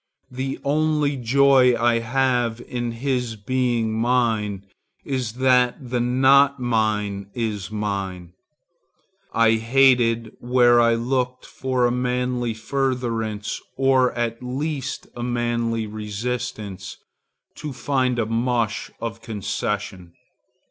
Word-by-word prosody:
The 130 Hz, +1 st, -3 dB
only 150 Hz, 0 st, +1 dB
joy 130 Hz, 0 st, +4 dB
I 120 Hz, 0 st, +3 dB
have 120 Hz, -1 st, 0 dB
in 120 Hz, -1 st, -4 dB
his 125 Hz, -1 st, -2 dB
being 120 Hz, 0 st, 0 dB
mine, 110 Hz, -4 st, 0 dB, 0.4 s
is 130 Hz, -5 st, -2 dB
that 125 Hz, 0 st, +2 dB
the 125 Hz, -, +1 dB
not 135 Hz, +3 st, +4 dB
mine 105 Hz, -4 st, -1 dB
is 110 Hz, -5 st, -3 dB
mine. 100 Hz, -5 st, -4 dB, 1.0 s
I 115 Hz, -1 st, +4 dB
hate, 115 Hz, -1 st, +3 dB
where 120 Hz, -1 st, +4 dB
I 115 Hz, 0 st, +4 dB
looked 125 Hz, +1 st, -2 dB
for 130 Hz, -1 st, -1 dB
a 120 Hz, -, +2 dB
manly 125 Hz, -1 st, -1 dB
furtherance, 115 Hz, -4 st, -2 dB, 0.2 s
or 130 Hz, -1 st, +3 dB
at 115 Hz, -1 st, -2 dB
least 140 Hz, +2 st, -3 dB
a 120 Hz, -, -6 dB
manly 120 Hz, -2 st, -1 dB
resistance, 105 Hz, -2 st, -5 dB, 0.6 s
to 150 Hz, -1 st, -5 dB
find 130 Hz, -2 st, 0 dB
a 115 Hz, -, +1 dB
mush 115 Hz, -1 st, -1 dB
of 115 Hz, 0 st, -5 dB
concession. 100 Hz, -4 st, -4 dB
120 Hz, 105 wpm, -23 LUFS, 110-130 Hz, 1.0 s, joy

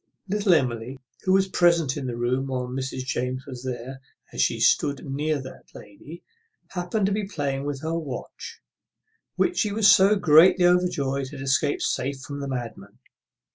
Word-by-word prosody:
Little 200 Hz, -2 st, +2 dB
Emily, 125 Hz, -2 st, -2 dB, 0.3 s
who 185 Hz, -, +3 dB
was 195 Hz, 0 st, +3 dB
present 170 Hz, -7 st, +2 dB
in 140 Hz, -3 st, -4 dB
the 120 Hz, -1 st, -4 dB
room 125 Hz, +3 st, -1 dB
while 130 Hz, -1 st, -2 dB
Mrs. 130 Hz, 0 st, -4 dB
James 130 Hz, +1 st, -3 dB
was 125 Hz, -1 st, -9 dB
there, 130 Hz, +1 st, -6 dB, 0.3 s
as -, -, -1 dB
she -, -, +1 dB
stood 140 Hz, -2 st, +2 dB
near 145 Hz, +2 st, -1 dB
that 130 Hz, 0 st, -11 dB
lady 150 Hz, +11 st, -12 dB, 0.5 s
happened 185 Hz, +3 st, -2 dB
to 200 Hz, -, 0 dB
be 205 Hz, 0 st, -2 dB
playing 140 Hz, -6 st, -3 dB
with 145 Hz, -2 st, -4 dB
her 160 Hz, +1 st, -2 dB
watch, 150 Hz, -6 st, -7 dB, 0.7 s
which 360 Hz, 0 st, 0 dB
she 210 Hz, -, +1 dB
was 210 Hz, 0 st, +3 dB
so 195 Hz, +2 st, +5 dB
greatly 180 Hz, +1 st, +5 dB
overjoyed 140 Hz, -7 st, +1 dB
had 145 Hz, -1 st, -9 dB
escaped 135 Hz, +1 st, 0 dB
safe 135 Hz, +1 st, -2 dB
from 140 Hz, +1 st, -7 dB
the 140 Hz, -, -4 dB
madman. 115 Hz, -5 st, -6 dB
140 Hz, 170 wpm, -24 LUFS, 130-180 Hz, 0.7 s, so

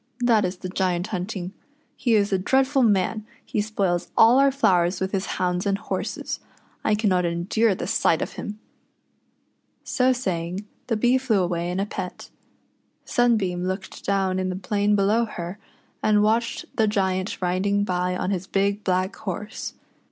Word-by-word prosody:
that 230 Hz, -3 st, +4 dB
is 180 Hz, 0 st, -2 dB
the 185 Hz, -, -6 dB
Giant 180 Hz, -1 st, 0 dB
hunting. 185 Hz, 0 st, -4 dB, 0.4 s
He 240 Hz, -4 st, +2 dB
is 200 Hz, -1 st, +2 dB
a 190 Hz, -, +2 dB
dreadful 265 Hz, +7 st, +2 dB
man 210 Hz, -1 st, +2 dB
— -, -, -32 dB
he 210 Hz, -, -1 dB
spoils 195 Hz, -5 st, -1 dB
all 235 Hz, +4 st, +7 dB
our 275 Hz, 0 st, +5 dB
flowers 180 Hz, -9 st, +2 dB
with 190 Hz, 0 st, -2 dB
his 195 Hz, -1 st, -1 dB
hounds 180 Hz, +1 st, 0 dB
and 195 Hz, 0 st, +1 dB
horses. -, -, -4 dB, 0.4 s
I 215 Hz, -, +3 dB
cannot 195 Hz, -4 st, +2 dB
endure 185 Hz, +5 st, +1 dB
the -, -, -4 dB
sight 175 Hz, -5 st, +2 dB
of -, -, -4 dB
him." 210 Hz, 0 st, -6 dB, 1.3 s
So 255 Hz, 0 st, +2 dB
saying, 185 Hz, -5 st, -2 dB, 0.2 s
the 225 Hz, -, 0 dB
Bee 245 Hz, +4 st, +3 dB
flew 225 Hz, -7 st, +2 dB
away 175 Hz, -1 st, -1 dB
in 180 Hz, +2 st, -2 dB
a 195 Hz, -, +1 dB
pet. 185 Hz, -3 st, -6 dB, 0.7 s
Sunbeam 200 Hz, -7 st, +1 dB
looked 190 Hz, +1 st, -5 dB
down 190 Hz, -1 st, +1 dB
in 185 Hz, 0 st, -1 dB
the 185 Hz, -, -3 dB
plain 205 Hz, +2 st, +1 dB
below 210 Hz, +4 st, +3 dB
her, 180 Hz, -2 st, -6 dB, 0.4 s
and 210 Hz, -1 st, +3 dB
watched 230 Hz, +2 st, +1 dB
the 220 Hz, -, +4 dB
Giant 190 Hz, -2 st, 0 dB
riding 195 Hz, +3 st, +1 dB
by 180 Hz, -1 st, -1 dB
on 185 Hz, -, -1 dB
his 190 Hz, -1 st, -2 dB
big 200 Hz, +1 st, 0 dB
black 185 Hz, 0 st, 0 dB
horse. 210 Hz, +3 st, -5 dB
195 Hz, 165 wpm, -24 LUFS, 180-215 Hz, 1.3 s, all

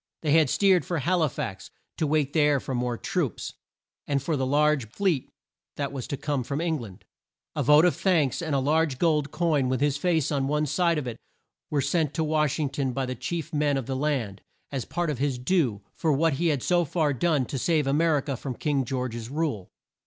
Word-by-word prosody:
They 150 Hz, -, +1 dB
had 155 Hz, -2 st, +5 dB
steered 190 Hz, +1 st, +4 dB
for 175 Hz, -, -2 dB
Hal 175 Hz, +4 st, +1 dB
i 155 Hz, -, +4 dB
fax, 95 Hz, -7 st, -5 dB, 0.3 s
to 155 Hz, -, 0 dB
wait 145 Hz, -2 st, +1 dB
there 150 Hz, -3 st, +3 dB
for 130 Hz, -, -5 dB
more 120 Hz, -1 st, -1 dB
troops, -, -, -2 dB, 0.5 s
and 140 Hz, -1 st, +1 dB
for 145 Hz, +4 st, -1 dB
the 130 Hz, -2 st, -1 dB
large 145 Hz, -4 st, +2 dB
fleet 175 Hz, -, 0 dB, 0.5 s
that 140 Hz, -2 st, -3 dB
was 135 Hz, -3 st, -5 dB
to 140 Hz, -, -3 dB
come 145 Hz, -3 st, -2 dB
from 140 Hz, +4 st, -3 dB
Eng 165 Hz, -2 st, 0 dB
land. 100 Hz, -6 st, -11 dB, 0.5 s
A -, -, 0 dB
vote 150 Hz, +3 st, +6 dB
of 180 Hz, -, +3 dB
thanks 165 Hz, -9 st, +1 dB
and 160 Hz, -4 st, -1 dB
a -, -, +3 dB
large 150 Hz, 0 st, +1 dB
gold 150 Hz, -2 st, +2 dB
coin 150 Hz, -7 st, +1 dB
with 130 Hz, -, 0 dB
his 145 Hz, 0 st, +1 dB
face 160 Hz, -2 st, +1 dB
on 135 Hz, -2 st, 0 dB
one 150 Hz, +1 st, +1 dB
side 165 Hz, +3 st, +1 dB
of 150 Hz, -, -2 dB
it, 120 Hz, -2 st, -5 dB, 0.5 s
were 145 Hz, -2 st, +1 dB
sent 150 Hz, +1 st, 0 dB
to 160 Hz, -, +1 dB
Wash 150 Hz, -2 st, +1 dB
ing 150 Hz, -4 st, -1 dB
ton 135 Hz, -2 st, -2 dB
by 135 Hz, 0 st, -1 dB
the 130 Hz, -, -3 dB
chief 165 Hz, +6 st, -4 dB
men 145 Hz, -2 st, +1 dB
of 135 Hz, -, -3 dB
the 135 Hz, -, -3 dB
land, 130 Hz, -8 st, -1 dB, 0.3 s
as 135 Hz, -3 st, -3 dB
part 170 Hz, -2 st, -1 dB
of 135 Hz, -, -5 dB
his 140 Hz, -2 st, 0 dB
due 125 Hz, -, 0 dB
for 160 Hz, -, 0 dB
what 155 Hz, +2 st, +2 dB
he 170 Hz, +6 st, 0 dB
had 145 Hz, -6 st, 0 dB
so 175 Hz, -1 st, +3 dB
far 155 Hz, -1 st, 0 dB
done 145 Hz, 0 st, +1 dB
to 135 Hz, -, -4 dB
save 155 Hz, +1 st, +1 dB
A 135 Hz, -, +1 dB
mer 160 Hz, 0 st, +3 dB
i -, -, 0 dB
ca 140 Hz, -1 st, -3 dB
from 130 Hz, +1 st, -5 dB
King 145 Hz, -1 st, 0 dB
George's 120 Hz, -2 st, -4 dB
rule. 140 Hz, -, -2 dB
145 Hz, 230 wpm, -26 LUFS, 130-160 Hz, 0.5 s, vote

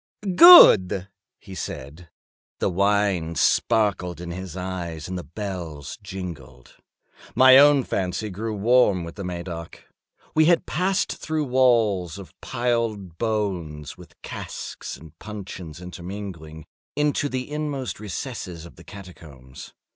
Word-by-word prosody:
"Good!" 100 Hz, -, +8 dB, 0.3 s
he 100 Hz, -2 st, -13 dB
said. 80 Hz, -1 st, -8 dB, 0.5 s
The -, -, -1 dB
wine 100 Hz, -3 st, +1 dB
sparkled 90 Hz, -3 st, +1 dB
in 85 Hz, 0 st, -7 dB
his 95 Hz, 0 st, -7 dB
eyes 90 Hz, -4 st, -5 dB
and 95 Hz, -, -5 dB
the 90 Hz, -, -5 dB
bells 85 Hz, -6 st, -7 dB
jingled. 85 Hz, -11 st, -9 dB, 0.6 s
My 130 Hz, +2 st, +8 dB
own 145 Hz, -1 st, +6 dB
fancy 100 Hz, +1 st, -3 dB
grew 110 Hz, +3 st, -4 dB
warm 105 Hz, -3 st, +3 dB
with 85 Hz, 0 st, -8 dB
the 100 Hz, -, -8 dB
Medoc. 85 Hz, -2 st, -7 dB, 0.5 s
We 155 Hz, 0 st, +4 dB
had 170 Hz, +1 st, +3 dB
passed 185 Hz, +2 st, 0 dB
through 155 Hz, -1 st, -2 dB
walls 115 Hz, -, +2 dB
of 100 Hz, -2 st, -11 dB
piled 115 Hz, -8 st, -2 dB
bones, 95 Hz, -10 st, -3 dB
with -, -, -17 dB
casks -, -, -7 dB
and 80 Hz, -2 st, -14 dB
puncheons 95 Hz, -6 st, -8 dB
intermingling, 90 Hz, -3 st, -8 dB, 0.3 s
into 145 Hz, -1 st, 0 dB
the 130 Hz, -1 st, -4 dB
inmost 145 Hz, -6 st, -4 dB
recesses 105 Hz, -, -6 dB
of 85 Hz, -, -15 dB
the 80 Hz, -, -14 dB
catacombs. 80 Hz, -10 st, -13 dB
95 Hz, 125 wpm, -23 LUFS, 85-115 Hz, 0.6 s, Good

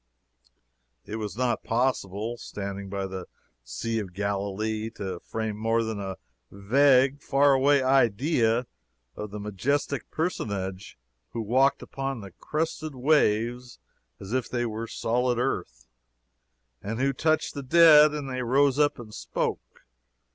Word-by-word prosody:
It 110 Hz, -, -5 dB
was 105 Hz, -1 st, -5 dB
not 120 Hz, -3 st, 0 dB
possible, 115 Hz, -2 st, -1 dB
standing 100 Hz, -4 st, -6 dB
by 100 Hz, 0 st, -3 dB
the 95 Hz, -1 st, -6 dB, 0.4 s
Sea 115 Hz, -, -3 dB
of 95 Hz, -4 st, -7 dB
Galilee, 100 Hz, +2 st, -2 dB
to 95 Hz, -3 st, -5 dB
frame 110 Hz, +1 st, -4 dB
more 115 Hz, +2 st, +1 dB
than 110 Hz, -2 st, -4 dB
a 95 Hz, -2 st, -5 dB, 0.3 s
vague, 130 Hz, +6 st, +3 dB
far 140 Hz, 0 st, +4 dB
away 135 Hz, +1 st, +4 dB
idea 125 Hz, -1 st, +2 dB, 0.5 s
of 105 Hz, -, -6 dB
the 105 Hz, +1 st, -7 dB
majestic 130 Hz, +8 st, -2 dB
Personage 100 Hz, -, -3 dB, 0.4 s
who 115 Hz, -, -2 dB
walked 130 Hz, +6 st, +2 dB
upon 135 Hz, -2 st, -4 dB
the 100 Hz, -1 st, -10 dB
crested 155 Hz, -, -3 dB
waves 125 Hz, -3 st, +1 dB, 0.4 s
as 100 Hz, +4 st, -7 dB
if 130 Hz, -1 st, -1 dB
they 120 Hz, 0 st, -1 dB
had 120 Hz, -, -1 dB
been 115 Hz, +1 st, -4 dB
solid 120 Hz, +2 st, 0 dB
earth, 90 Hz, -, -2 dB, 1.0 s
and 110 Hz, +4 st, -4 dB
who 135 Hz, +1 st, +1 dB
touched 155 Hz, +4 st, +1 dB
the 140 Hz, -, -5 dB
dead 155 Hz, +1 st, +7 dB
and 150 Hz, -2 st, -4 dB
they 130 Hz, -1 st, -3 dB
rose 135 Hz, +3 st, +2 dB
up 145 Hz, -1 st, +3 dB
and 110 Hz, -3 st, -10 dB
spoke. -, -, -4 dB
115 Hz, 140 wpm, -26 LUFS, 105-135 Hz, 1.0 s, dead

